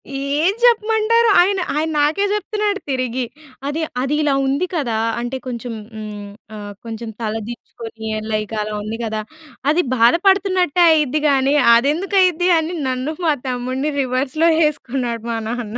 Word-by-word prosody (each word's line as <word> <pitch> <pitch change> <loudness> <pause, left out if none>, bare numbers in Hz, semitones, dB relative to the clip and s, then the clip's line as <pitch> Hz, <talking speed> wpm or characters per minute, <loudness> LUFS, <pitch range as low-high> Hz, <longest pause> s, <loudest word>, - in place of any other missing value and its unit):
ఏం 285 +6 +1
చెప్పమంటారు? 455 0 +3
ఆయన 390 +1 +2 0.2
ఆయన 315 +2 0
నాకే 310 +7 +2
జెప్తున్నాడు 420 -1 -1
తిరిగి. 255 -1 -1 0.4
అది 310 +3 -2 0.2
అది 275 +3 0
ఇలా 285 -2 +2
ఉంది 280 +7 +1
కదా! 240 -9 -1 0.2
అంటే 240 +2 -3
కొంచెం 240 -1 -5 0.2
హ్మ్, 210 -1 -7 0.3
ఆహ్, 205 -1 -7
కొంచెం 225 0 -6
తల 215 -1 -2
దించుకొని 225 -2 -8 0.2
లైక్ 215 +1 -2
అలా 210 0 -4
ఉంది 215 +2 -5
గదా! 220 -1 -2 0.5
అది 355 +3 +2
బాధపడుతున్నట్టే 360 - +3
అయిద్ది 300 -1 +2
గానీ! 275 +1 +2 0.2
అదెందుకు 310 +11 +1
అయిద్ది? 360 0 +2
అని 325 +3 -3
నన్ను 255 +5 -2
మా 310 - +4
తమ్ముడిని 255 +4 -2
రివర్స్‌లో 265 +6 +1 0.2
ఏసుకున్నాడు 245 -5 -3
మా 225 - -1
నాన్న. 240 -1 -4
275 Hz, 140 wpm, -19 LUFS, 235-350 Hz, 0.5 s, మా